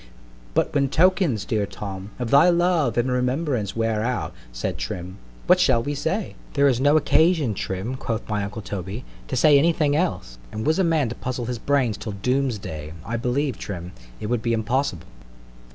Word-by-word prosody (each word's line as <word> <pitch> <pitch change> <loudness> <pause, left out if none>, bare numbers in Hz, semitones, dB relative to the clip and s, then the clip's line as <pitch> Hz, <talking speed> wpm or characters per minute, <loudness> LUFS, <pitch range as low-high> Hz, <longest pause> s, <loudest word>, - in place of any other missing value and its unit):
_" - - -20 0.5
——But - - +1
when 140 -2 +2
tokens, 165 - +2
dear 105 -3 0
Tom, 100 -1 -7
of 120 -2 -3
thy 145 +6 +7
love 170 -8 +2
and 125 +2 +1
remembrance 125 - 0
wear 115 -1 0
out, 125 +2 -2 0.2
said - - -4
Trim, 90 +2 -5 0.3
what - - +5
shall 115 - +3
we 145 - -2
say? 175 +8 -2 0.2
There 140 0 +4
is 125 -3 +2
no 145 +2 +5
occasion, 160 -4 +3
Trim, 95 +5 -3
quoth 115 -3 -3
my 105 -1 -1
uncle 105 +2 -6
Toby, 100 +5 -5 0.2
to - - -3
say 145 +3 +6
any 165 +4 +3
thing 145 -2 +1
else; 90 - -2
and 110 0 -4
was 160 +4 +2
a - - +4
man 160 -7 +2
to - - -4
puzzle 125 -1 -4
his 120 -1 -3
brains 130 -7 +1
till 105 - -5
Doom's 125 +4 0
day, 80 -5 -7
I 115 - -3
believe, 125 +3 -1
Trim, 90 -3 -6 0.3
it - - -5
would 120 +1 0
be 115 0 0
impossible. 115 - -1
120 Hz, 195 wpm, -23 LUFS, 105-145 Hz, 0.5 s, thy